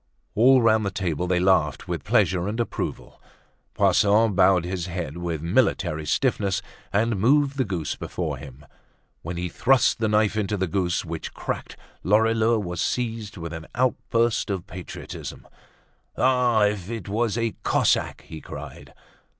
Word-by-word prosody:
All 125 +3 +5
round 110 -1 +4
the 100 - 0
table 90 -3 -2
they 90 0 +2
laughed 90 -6 +2
with - - -3
pleasure 90 0 +2
and 110 +3 -3
approval. 120 - -4 0.5
Poisson 105 +1 +4
bowed 90 -2 +4
his 90 -1 -3
head 85 -3 -5
with 85 -3 -3
military 80 -2 +1
stiffness, 105 -7 0 0.3
and 110 +2 +1
moved 140 +4 +3
the 135 - +1
goose 90 - -3
before - - -4
him. 70 +2 -12 0.6
When 85 +1 -5
he 90 +1 -2
thrust 125 - +2
the 110 - +1
knife 105 0 +2
into 105 -1 -1
the 95 - 0
goose, 90 0 -1
which 80 -1 -6
cracked, - - -5 0.3
Lorilleux 110 +3 +3
was 90 -5 -3
seized 115 -4 -2
with 85 -1 -6
an 80 0 -7
outburst 120 -3 +1
of 95 -3 -3
patriotism. 90 0 -8 0.7
"Ah! 125 -4 +3
if 105 -2 0
it 115 -2 -5
was 110 +2 0
a 115 -1 -1
Cossack!" - - +1
he 80 - -10
cried. - - -10
100 Hz, 150 wpm, -24 LUFS, 90-115 Hz, 0.7 s, All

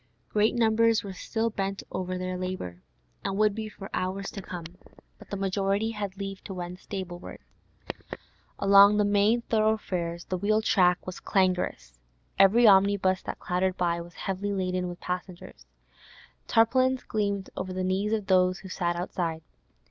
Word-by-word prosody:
Great 215 +2 +2
numbers 230 -1 +3
were 195 -2 -6
still 225 +4 -2
bent 195 -1 -3
over 185 0 -3
their 185 0 -3
labour, 180 - -5 0.4
and 195 - -2
would 215 -1 +3
be 220 0 -5
for 195 -2 -9
hours 190 +2 -2
to 200 - -7
come, 175 -2 -7 0.5
but - - -15
the 200 - -3
majority 195 +3 0
had 205 -3 -5
leave 195 -1 -6
to 190 - -7
wend 180 0 -6
stable 185 -4 -6
wards. - - -10 1.1
Along 200 +1 +7
the 210 - +3
main 205 +4 +3
thoroughfares 195 -7 0
the 185 - -3
wheel 215 +3 +2
track 180 -4 +3
was 185 - -6
clangorous; 180 - 0 0.4
every 220 +5 +6
omnibus 195 -2 +4
that - - -5
clattered 185 +1 -1
by 170 -1 0
was 175 0 -12
heavily 195 +1 -3
laden 185 -1 -1
with 175 - -8
passengers; 180 0 -6 0.8
tarpaulins 255 +3 +3
gleamed 200 -2 -2
over 185 0 -4
the 185 0 -2
knees 190 +3 0
of 215 -2 0
those 185 -1 +3
who 190 - -10
sat 175 -2 -1
outside. 170 -2 -3
195 Hz, 160 wpm, -27 LUFS, 180-210 Hz, 1.1 s, Along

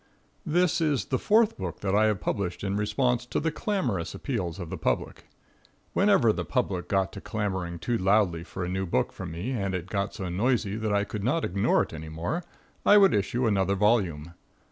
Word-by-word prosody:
This 175 +1 +2
is 145 -9 +1
the 130 - -1
fourth 215 - +3
book 90 -4 -5
that 100 -1 -1
I 105 +1 +4
have 105 -3 +1
published 90 -2 -2
in 100 0 -1
response 120 +4 +1
to - - -1
the 160 +1 0
clamorous 125 - -2
appeals 95 - -3
of 90 -4 -7
the - - -2
public. - - -2 0.7
Whenever 195 - +4
the - - -3
public 95 -9 -1
got 95 0 +1
to 100 - -8
clamoring 95 -5 -3
too 115 +6 -1
loudly 95 -3 +2
for 90 +1 -5
a - - -4
new 95 +1 -2
book - - 0
from - - -7
me 90 +10 -4
and 100 -6 -1
it 90 -2 -3
got 100 +1 -2
so 95 - -4
noisy 105 +2 0
that 110 -1 -2
I 100 0 +2
could 105 -1 -5
not 155 +9 +1
ignore 95 +2 +2
it - - -9
any 80 0 -7
more, 85 - -3 0.4
I 205 - +7
would 195 -1 +6
issue 115 +5 0
another 100 -3 +2
volume. 95 -7 +1
100 Hz, 205 wpm, -27 LUFS, 90-125 Hz, 0.7 s, I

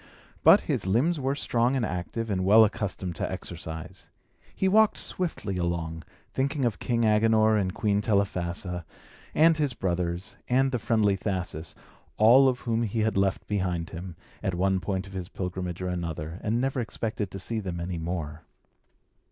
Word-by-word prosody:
But - - +8
his - - -1
limbs 140 - +2
were 135 +1 0
strong 120 -2 +1
and 125 -4 +1
active 105 +5 -3
and 95 -2 0
well 110 +4 +7
accustomed 95 -4 -3
to - - -2
exercise. 85 +2 -7 0.5
He 190 - +1
walked 215 +2 +4
swiftly 110 - -3
along, 85 -2 -2 0.3
thinking 135 0 0
of 115 -5 -1
King 115 -1 +1
Agenor 110 0 +4
and 95 -3 +1
Queen 100 +1 0
Telephassa, 90 -4 -1 0.5
and 160 +1 +5
his 145 -5 0
brothers, 90 -1 -2
and 135 +2 +3
the 125 - -1
friendly 105 -3 +2
Thasus, 90 -5 -4 0.4
all 125 +5 +7
of 125 -1 -3
whom 115 -1 0
he 115 0 -1
had 110 0 +1
left 95 0 +1
behind 90 -3 -2
him, 90 0 -7 0.3
at 95 -4 -1
one 95 +1 +2
point 95 0 -2
of 95 - -12
his 95 -1 -5
pilgrimage 90 -2 -4
or 90 - -1
another, 85 -1 -4
and 110 +3 0
never 135 +1 0
expected 110 -3 -3
to 95 - -6
see 110 +4 -1
them 90 -4 -4
any 85 0 -3
more. 80 -2 -4
100 Hz, 170 wpm, -27 LUFS, 90-115 Hz, 0.5 s, But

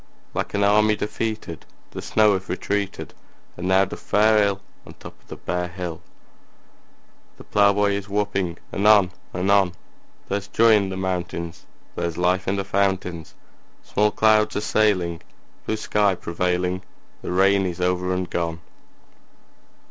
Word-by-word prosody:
Like - - -3
an 100 - +2
army 105 +1 +4
defeated 105 -5 -4 0.3
The - - -6
snow 105 -1 +3
hath 95 0 -4
retreated, 100 +1 -3 0.4
And 90 +1 -5
now 95 +1 +4
doth - - -8
fare 110 +1 +3
ill 100 -1 +1 0.3
On - - -13
the - - -21
top - - -11
of - - -31
the - - -8
bare 90 0 -3
hill; 85 -2 -6 1.4
The - - -12
plowboy 100 0 +3
is 100 0 -3
whooping 100 -4 -1 0.2
anon 100 -2 +5 0.2
anon: 95 0 +3 0.5
There's 100 0 -3
joy 115 +2 +4
in 100 -3 +3
the 95 - -5
mountains; 90 -2 -4 0.3
There's 85 -1 -3
life 90 +1 +1
in 95 - +1
the 100 -1 -2
fountains; 95 -4 -1 0.5
Small 105 +1 +1
clouds 105 +1 +3
are 105 - 0
sailing, 90 -6 +1 0.5
Blue 110 - -1
sky 105 -2 +1
prevailing; 90 +1 -1 0.4
The - - -5
rain 95 +1 +3
is 90 0 -5
over 90 0 0
and 90 0 -1
gone! 85 -1 -3
95 Hz, 150 wpm, -23 LUFS, 90-105 Hz, 1.4 s, anon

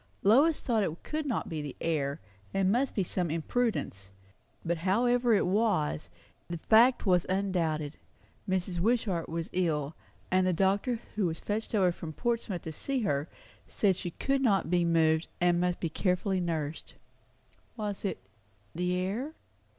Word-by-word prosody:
Lois 280 +10 +5
thought 230 -3 +1
it 165 -4 -3
could 305 -1 -3
not 250 - -1
be 155 -2 -3
the 145 -2 -6
air, 145 -4 -1 0.4
and 195 -1 +3
must 255 +4 +1
be 195 - +2
some 180 -1 -2
imprudence; 165 - -1 0.6
but 170 0 0
however 240 +7 +2
it - - +2
was, 185 - +1 0.4
the 170 - -3
fact 230 +9 +4
was 180 -3 +4
undoubted. 170 -6 -1 0.5
Mrs. 185 -1 -1
Wishart 200 -4 +1
was 165 0 -3
ill; 155 -5 0 0.4
and 185 0 +3
the 185 - +2
doctor 195 +7 +1 0.2
who 205 -4 +1
was 160 -1 -3
fetched 220 +2 -3
over 185 -4 +4
from 165 -2 -7
Portsmouth 230 -4 -2
to 160 - -5
see 265 - -2
her, 145 -6 -1 0.4
said 195 -3 +2
she 180 - -4
could 275 +10 -1
not 200 -9 +2
be 175 -1 +3
moved, 160 -1 +3
and 175 -1 +3
must 180 0 0
be 170 - -1
carefully 185 +3 0
nursed. 160 -3 -3 0.8
Was 205 -3 -4
it 200 - -1 0.6
the 180 +1 0
air? 205 +12 -2
185 Hz, 160 wpm, -30 LUFS, 165-220 Hz, 0.8 s, Lois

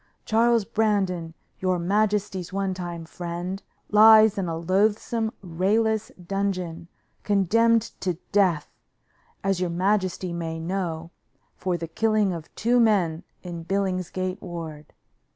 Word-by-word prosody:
"Charles 230 0 +3
Brandon, 190 -7 0 0.2
your 185 -1 +1
majesty's 200 0 0
one 195 0 -1
time 175 -2 -6
friend, 175 +3 -5 0.3
lies 215 0 +8
in 195 -3 -2
a 165 -1 -2
loathsome, 210 +5 +1
rayless 215 +5 0
dungeon, 180 -3 -2 0.3
condemned 220 +3 +3 0.2
to 180 -2 -1 0.2
death, 185 -7 +2 0.8
as 195 -1 +1
your 180 -1 0
majesty 185 0 0
may 165 -1 -4
know, 170 -1 -3 0.4
for 180 -2 -2
the 165 0 -5
killing 215 +2 +1
of 165 -2 -7
two 240 +2 +2
men 185 -7 +2 0.2
in 170 -2 -6
Billingsgate 185 0 -2
Ward. 160 -4 -7
185 Hz, 115 wpm, -25 LUFS, 170-210 Hz, 0.8 s, lies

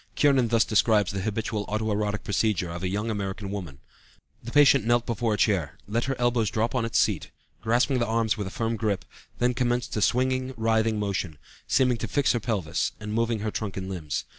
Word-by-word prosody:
Kiernan 135 -4 +4
thus 115 0 +3
describes 110 -2 +3
the 100 -1 -3
habitual 110 +1 -2
auto 110 +1 -1
erotic 105 0 -1
procedure 100 -4 0
of 85 0 -6
a 95 - -1
young 105 +4 -2
American 100 -1 -4
woman: 90 -9 -6 0.7
"The 115 - -6
patient 140 -3 +6
knelt 120 +1 +2
before 115 -1 0
a - - -5
chair, 95 - +1
let 115 +3 -1
her 135 +1 -1
elbows 120 -3 +1
drop 110 +3 -1
on 125 -3 0
its 115 - -1
seat, - - +1 0.3
grasping 125 +3 +2
the 120 - 0
arms 110 0 +1
with 105 -3 -4
a - - -4
firm 115 +3 -2
grip, 100 -5 -1 0.3
then 125 +1 +2
commenced 120 0 -1
a 105 - -1
swinging, 130 +3 +1
writhing 110 -1 +1
motion, 100 -6 -2 0.3
seeming 125 -2 +3
to - - -4
fix 145 -2 +2
her 120 - 0
pelvis, 105 -10 -1
and 105 0 -5
moving 115 -1 0
her 110 0 -2
trunk 105 -3 -4
and 95 0 -4
limbs. 80 -6 -4
110 Hz, 210 wpm, -26 LUFS, 100-120 Hz, 0.7 s, patient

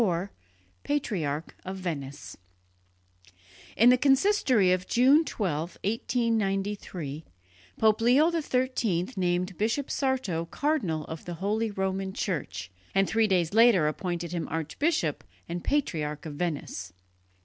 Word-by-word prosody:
IV 185 -2 0 0.5
PATRIARCH 170 - -2
OF 190 +1 -5
VENICE 145 -7 -5 1.4
In 235 +3 +7
the 250 - +4
consistory 270 - +4
of 185 0 0
June 270 +6 +5
12, 170 - -3
1893, 200 - -1 0.6
Pope 220 0 +4
Leo 270 +8 +5
XIII 255 - 0
named 180 0 0
Bishop 225 +6 0
Sarto 255 - -1
cardinal 185 - -1
of 160 -1 -8
the 175 - -5
Holy 215 +5 -1
Roman 190 -1 -2
Church, 125 - -3 0.2
and 195 0 +4
three 225 0 +2
days 180 -3 +1
later 220 -8 +6
appointed 170 +1 -3
him 170 -2 -3
archbishop 160 - -1 0.2
and 170 +1 -4
patriarch 155 - -1
of 155 - -5
Venice. 145 - -4
190 Hz, 115 wpm, -28 LUFS, 165-235 Hz, 1.4 s, In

